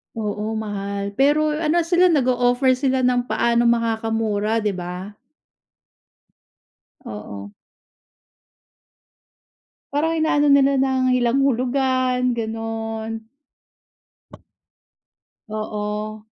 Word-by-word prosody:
Oo, 215 0 -3
mahal. 200 -2 -4
Pero 295 +3 +3
ano 325 +2 +1
sila 350 +2 +3
nag-o-offer 255 -4 +2
sila 260 -1 +1
ng 250 -1 +1
paano 235 -1 +1
makakamura, 225 -2 0
di 210 - 0
ba? 185 +2 -6 1.9
Oo. 100 -1 -8 2.4
Parang 325 +3 0
ina-ano 295 -2 +2
nila 280 0 +5
ng 265 -1 +1 0.2
ilang 240 +2 +2
hulugan, 255 -1 +1
gano'n. 225 0 -5 2.2
Oo. 215 0 -4
235 Hz, 75 wpm, -21 LUFS, 215-265 Hz, 2.4 s, nila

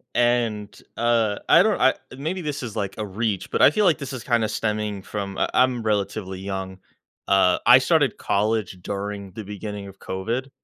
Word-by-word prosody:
And, 115 -4 +1 0.2
uh, 115 -3 +2
I 170 - +7
don't 215 -2 +1
I 130 - +5 0.2
maybe 165 +7 -3
this 145 -4 -4
is, 115 -4 -6
like, 100 -3 -3
a 110 - -3
reach, 105 0 -3
but - - 0
I - - +8
feel 210 +4 +2
like 170 -4 +4
this 140 -3 -6
is 130 - -6
kinda 115 -3 +1
stemming 105 -2 -2
from 100 -2 -5
I - - 0
I'm 125 -2 +2
relatively 100 -2 -2
young. 95 -1 -5 0.5
Uh, 95 -2 +4
I 120 +1 +9
started 145 +2 +2
college 105 -1 0
during 100 0 -5
the 110 - -7
beginning 105 0 -6
of 95 0 -13
COVID, 115 +8 -3
110 Hz, 185 wpm, -23 LUFS, 100-125 Hz, 0.5 s, I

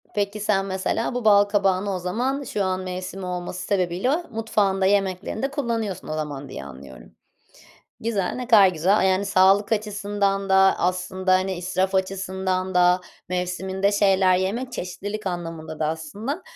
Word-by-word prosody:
Peki, 205 +1 -1
sen, 200 -2 +1
mesela, 190 +5 -2
bu 245 -3 -3
bal 205 -1 +7
kabağını 200 -1 +1
o - - -3
zaman 250 +10 -2
şu 210 -5 -2
an 185 0 -1
mevsimi 185 +1 -5
olması 180 0 -4
sebebiyle 200 - 0
mutfağında, 205 -4 0
yemeklerinde 200 +6 0
kullanıyorsun 230 - -3
o 155 - -3
zaman 145 -3 -5
diye 70 0 -7
anlıyorum. 65 -3 -12 0.9
Güzel, 210 -5 -1
ne 250 -1 -5
kadar 205 -5 +7
güzel. 185 +5 +2
Yani, 190 +1 +1
sağlık 195 +3 +4
açısından 205 -2 -1
da 190 0 +5
aslında, 185 +1 0
hani, 185 0 +1
israf 185 +2 -1
açısından 190 -1 -1
da 180 0 +4 0.3
mevsiminde 190 +2 -1
şeyler 190 -2 +4
yemek 230 +7 -2
çeşitlilik 205 +4 -5
anlamında 165 -3 -5
da 155 - 0
aslında, 210 - -4
190 Hz, 145 wpm, -23 LUFS, 180-205 Hz, 0.9 s, bal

